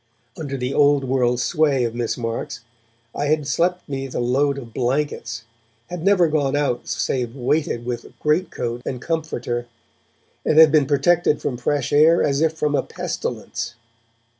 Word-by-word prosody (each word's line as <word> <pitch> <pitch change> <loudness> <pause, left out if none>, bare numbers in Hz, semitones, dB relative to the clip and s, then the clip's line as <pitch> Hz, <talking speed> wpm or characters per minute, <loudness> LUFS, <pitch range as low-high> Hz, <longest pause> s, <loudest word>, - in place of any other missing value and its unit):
Under 140 -3 -4
the 125 +1 -2
old 145 -1 +4
world 125 -2 +1
sway 140 -1 +2
of 115 -1 -1
Miss 120 -1 -2
Marks, 115 -1 -4 0.5
I 145 - -2
had 155 0 +1
slept 175 +5 0
beneath 135 -2 -5
a - - 0
load 135 +4 +1
of 120 -4 -9
blankets, 125 -3 -2 0.5
had 175 -2 -5
never 195 -3 +4
gone 145 -3 0
out 140 -4 -1
save 125 -2 -2
weighted 130 -2 -1
with 120 -1 -4
great 155 +5 +1
coat 120 0 -4
and 125 - -4
comforter, 125 -7 -3 0.8
and 155 - +1
had 160 -2 +9
been 150 -3 +4
protected 150 +2 +3
from 130 - -2
fresh 140 +3 -1
air 160 +3 +5
as 140 0 +1
if 160 0 +2
from 150 -2 -1
a - - +3
pestilence. - - -5
140 Hz, 165 wpm, -22 LUFS, 125-155 Hz, 0.8 s, had